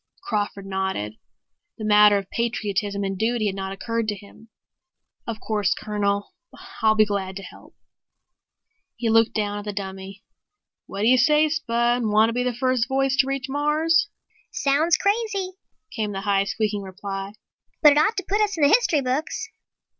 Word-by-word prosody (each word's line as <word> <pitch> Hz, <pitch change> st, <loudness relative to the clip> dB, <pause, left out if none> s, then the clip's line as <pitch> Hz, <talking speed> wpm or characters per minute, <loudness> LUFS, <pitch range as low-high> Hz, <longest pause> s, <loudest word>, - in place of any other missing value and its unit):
Crawford 205 Hz, -, -3 dB
nodded. 190 Hz, -, -3 dB, 0.6 s
The 215 Hz, -, -5 dB
matter 210 Hz, -1 st, +6 dB
of 195 Hz, -1 st, -6 dB
patriotism 205 Hz, -3 st, -2 dB
and 195 Hz, 0 st, -2 dB
duty 225 Hz, 0 st, 0 dB
had 200 Hz, -, 0 dB
not 190 Hz, 0 st, -5 dB
occurred 230 Hz, +3 st, -3 dB
to 210 Hz, -, -1 dB
him. 210 Hz, +3 st, -16 dB, 0.8 s
"Of 225 Hz, -2 st, -4 dB
course, 210 Hz, -5 st, 0 dB
Colonel, 205 Hz, -, -2 dB, 0.5 s
I'll 220 Hz, 0 st, +4 dB
be 215 Hz, 0 st, +5 dB
glad 195 Hz, -2 st, -3 dB
to 195 Hz, -, -7 dB
help." -, -, -14 dB, 1.2 s
He 230 Hz, -2 st, -1 dB
looked 225 Hz, 0 st, +3 dB
down 205 Hz, -1 st, -1 dB
at 205 Hz, -, -9 dB
the 210 Hz, -, -3 dB
dummy. 195 Hz, 0 st, -7 dB, 0.6 s
"What 195 Hz, -, -6 dB
do 215 Hz, -, +2 dB
you 255 Hz, +1 st, +5 dB
say, 300 Hz, +4 st, +4 dB
Spud? 240 Hz, -5 st, 0 dB
Want 215 Hz, +1 st, +3 dB
to -, -, -3 dB
be 245 Hz, -, 0 dB
the 250 Hz, 0 st, 0 dB
first 255 Hz, -1 st, +1 dB
voice 270 Hz, 0 st, +1 dB
to 270 Hz, -, +3 dB
reach 275 Hz, -1 st, -2 dB
Mars?" 300 Hz, +4 st, +2 dB, 0.4 s
"Sounds 295 Hz, +5 st, +2 dB
crazy," 405 Hz, -2 st, -1 dB, 0.4 s
came 215 Hz, -3 st, -3 dB
the 195 Hz, -, -4 dB
high, 200 Hz, -1 st, +1 dB
squeaking 210 Hz, 0 st, -2 dB
reply. 195 Hz, +1 st, -6 dB, 0.5 s
"But 300 Hz, -, +9 dB
it 290 Hz, -, +4 dB
ought 410 Hz, +9 st, +2 dB
to 380 Hz, -, -3 dB
put 415 Hz, +2 st, +1 dB
us 415 Hz, -4 st, 0 dB
in 310 Hz, -, 0 dB
the 285 Hz, -, +6 dB
history 435 Hz, -, +3 dB
books." 295 Hz, -, -2 dB
220 Hz, 175 wpm, -23 LUFS, 200-275 Hz, 1.2 s, But